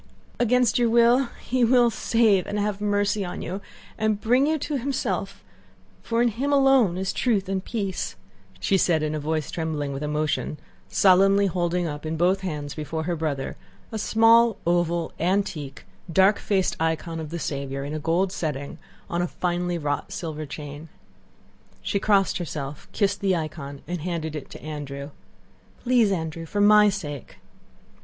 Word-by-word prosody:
"Against 245 -1 +3
your 240 -1 +3
will 235 +3 +5 0.2
He 255 0 0
will 240 0 +5
save 220 -5 +2
and 205 - -3
have 205 -1 -1
mercy 205 0 +1
on 175 - -5
you 190 +3 -4 0.4
and 215 -1 +1
bring 250 +6 +3
you 315 +1 +2
to 290 -1 -2
Himself, 200 -7 -3 0.6
for 230 +1 +1
in 240 - +3
Him 260 +6 -2
alone 270 -9 +4
is 190 0 -2
truth 210 -7 +1
and 190 -1 -2
peace," 200 -5 -3 0.4
said 190 - +2 0.2
she - - +1
in 155 - -2
a 155 - -2
voice 155 0 -2
trembling 155 -4 -2
with 135 - -5
emotion, 150 0 -1 0.3
solemnly 195 - +5
holding 175 -1 0
up 150 -2 -5
in 160 0 -3
both 185 +3 +2
hands 150 -6 -4
before 160 +1 -4
her 175 +1 -1
brother 150 -4 -3 0.3
a 220 - -3
small, 225 +1 +5
oval, 170 -1 +1
antique, 175 -5 -1 0.3
dark 190 +4 +4
faced 190 -3 0
icon 160 +1 -1
of 155 -2 -6
the 170 - -4
Saviour 140 -3 -3
in 145 +2 -5
a 155 - -2
gold 170 +5 +1
setting, 145 -6 -4 0.3
on 170 - -1
a 175 - 0
finely 175 0 -2
wrought 145 -2 -2
silver 155 -3 -5
chain. 145 +2 -8 0.9
She 200 - 0
crossed 195 -2 +2
herself, 150 -4 -5
kissed 200 -1 0
the 195 -2 +2
icon, 155 -4 -5
and 175 -2 -3
handed 160 -2 -3
it 150 - -7
to - - -11
Andrew. 145 -2 -6 0.7
"Please, 240 -4 +3
Andrew, 165 -2 -3
for 205 - -3
my 210 0 +7
sake!..." 150 -9 -6
180 Hz, 165 wpm, -25 LUFS, 155-210 Hz, 0.9 s, my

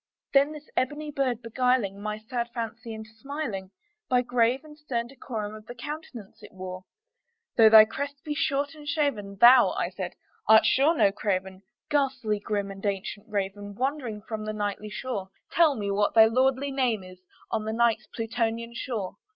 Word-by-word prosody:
Then 280 +2 +5
this 300 0 -10
ebony 295 +3 -1
bird 255 -4 -1
beguiling 230 -4 +1
my 210 0 -3
sad 235 +2 -4
fancy 230 0 -5
into 220 0 -8
smiling 220 -5 -5 0.4
By 250 -1 +4
the - - -10
grave 245 +1 +3
and 300 -1 -12
stern 260 -6 -3
decorum 230 -4 -6
of 215 0 -11
the 245 - -8
countenance 255 -5 -8
it - - -12
wore, 185 -1 -7 0.7
"Though 225 -2 +8
thy 215 0 +10
crest 280 +5 -5
be 305 -2 -3
shorn 290 -2 0
and 300 -2 -12
shaven, 275 -10 -1
thou," 245 +2 +8
I - - -1
said, - - -5 0.3
"art 220 0 +7
sure 300 +5 +4
no 200 - +5
craven, 190 -2 -2 0.3
Ghastly 260 -7 +1
grim 205 -1 -2
and 195 0 -10
ancient 200 +1 -3
Raven 205 0 -3
wandering 255 -4 -2
from 220 -1 -5
the 215 - -3
Nightly 210 0 -3
shore, 210 -3 -4 0.2
Tell, 320 -4 +4
me 205 -3 -2
what 205 +2 +1
thy 220 -1 +9
lordly 260 +4 +2
name 250 -7 0
is 185 0 -13 0.3
on 220 -1 -1
the 220 - -2
Night's 235 0 +2
Plutonian 230 0 -2
shore!" 230 -5 -4
230 Hz, 175 wpm, -27 LUFS, 210-270 Hz, 0.7 s, thy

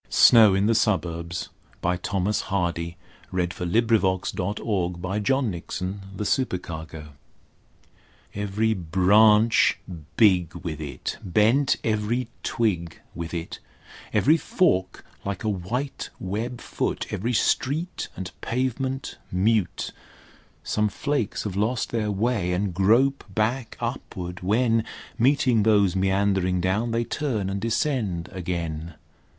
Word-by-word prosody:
Snow 110 -5 +7
in 95 +1 +2
the 115 - +3
Suburbs, 90 -6 -1 0.3
by 90 +1 +1
Thomas 95 +3 -1
Hardy 85 -3 -1 0.3
SNOW 95 - -5
IN 90 -1 +1 1.5
THE 95 -1 -2
SUBURBS 80 - -2 1.3
Every 105 +2 0
branch 105 +5 +4 0.4
big 90 -6 +4
with 80 -3 -5
it, 75 -2 -5
Bent 110 +9 +3
every 110 +3 0
twig 90 -8 -1
with 85 0 -6
it; 85 0 -5 0.5
Every 155 +4 +4
fork 95 - 0 0.2
like 100 -2 -4
a 110 - 0
white 110 +9 -3
web 115 +6 -3
foot; - - -2
Every 115 +6 -1
street 145 - 0
and 95 -1 -5
pavement 130 +2 -2
mute: 100 +1 +1 0.7
Some 105 0 +1
flakes 140 -2 -2
have 105 -3 -4
lost 110 +5 0
their 110 -3 0
way, 100 -3 0
and 95 +1 -1
grope 115 +9 +3
back 110 +5 -1
upward, 95 -7 -5
when 115 +4 +2 0.4
Meeting 125 -2 +3
those 100 -3 +3
meandering 95 -1 +1
down 95 +6 0
they 115 +1 0
turn 115 -8 -2
and 100 0 -3
descend 115 - -1
again. 85 -3 -4
100 Hz, 110 wpm, -25 LUFS, 90-115 Hz, 1.5 s, Snow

